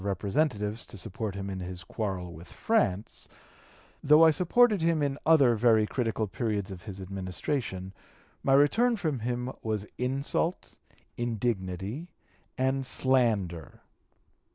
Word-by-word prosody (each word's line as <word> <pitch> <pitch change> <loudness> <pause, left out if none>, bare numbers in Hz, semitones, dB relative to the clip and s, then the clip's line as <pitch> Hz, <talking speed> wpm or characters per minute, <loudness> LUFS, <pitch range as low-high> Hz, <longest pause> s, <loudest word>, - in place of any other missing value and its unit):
240) 100 -1 -2
Representatives 105 - -1
to - - -9
support 100 +1 -5
him 100 0 -4
in 95 -1 -4
his 90 0 -6
quarrel 90 -3 -4
with 85 +2 -12
France; 115 - -1 0.8
though 150 +3 +7
I 160 - +7
supported 200 +6 +3
him 165 -2 +2
in 140 0 -1
other 140 -7 +6
very 110 -1 +4
critical 115 -2 -1
periods 105 -1 -2
of 90 -2 -8
his 100 -3 -7
Administration, 95 - -4 0.5
my 135 - +2
return 220 - +4
from 155 - -2
him 125 +2 -2
was 110 -2 -2
insult, 140 +7 -2 0.4
indignity, 110 - -2 0.5
and 130 +1 +1
slander." 115 - 0
115 Hz, 130 wpm, -28 LUFS, 95-140 Hz, 0.8 s, though